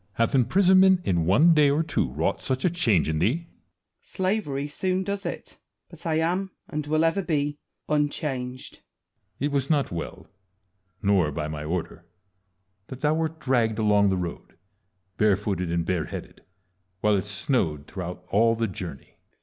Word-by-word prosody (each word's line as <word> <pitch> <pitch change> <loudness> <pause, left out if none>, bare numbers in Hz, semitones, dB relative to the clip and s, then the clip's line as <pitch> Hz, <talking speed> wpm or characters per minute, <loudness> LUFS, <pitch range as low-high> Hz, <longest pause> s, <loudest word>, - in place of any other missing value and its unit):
hath 115 +4 +1
imprisonment 185 - +5
in 85 -3 +1
one 150 - +6
day 150 -2 +5
or 150 +3 +2
two 160 - -1
wrought 80 +8 -1
such 130 +3 -1
a 180 - +3
change 115 - +2
in 80 -1 0
thee? 130 - +1
Wallace. - - -29 0.5
Slavery 185 -8 -2
soon 185 +5 -1
does 200 0 -3
it; - - -7 0.3
but - - -9
I 160 - +1
am, 175 +4 0 0.2
and 150 0 -4
will 155 +1 +2
ever 165 +5 +1
be, 145 -4 -1 0.3
unchanged. 145 -4 -2 0.6
Edward. 140 - -2
It 145 - -1
was 140 -1 0
not 145 -3 +1
well, 85 -1 -6 0.8
nor 95 -6 +3
by 75 +1 -3
my 75 -1 -5
order, 85 +2 -4 0.8
that 130 -1 -9
thou 150 0 +3
wert 160 0 -2
dragged 120 -6 +1
along 105 -2 +3
the 95 - +1
road, 90 -2 -6 0.6
barefooted 100 -4 +1
and 85 -1 0
bareheaded, 90 -3 -4 0.6
while 105 0 +3
it 95 - -1
snowed 100 - -1
throughout 90 0 -7
all 115 +3 +4
the 115 0 0
journey. 90 -8 -8
130 Hz, 160 wpm, -25 LUFS, 95-160 Hz, 0.8 s, one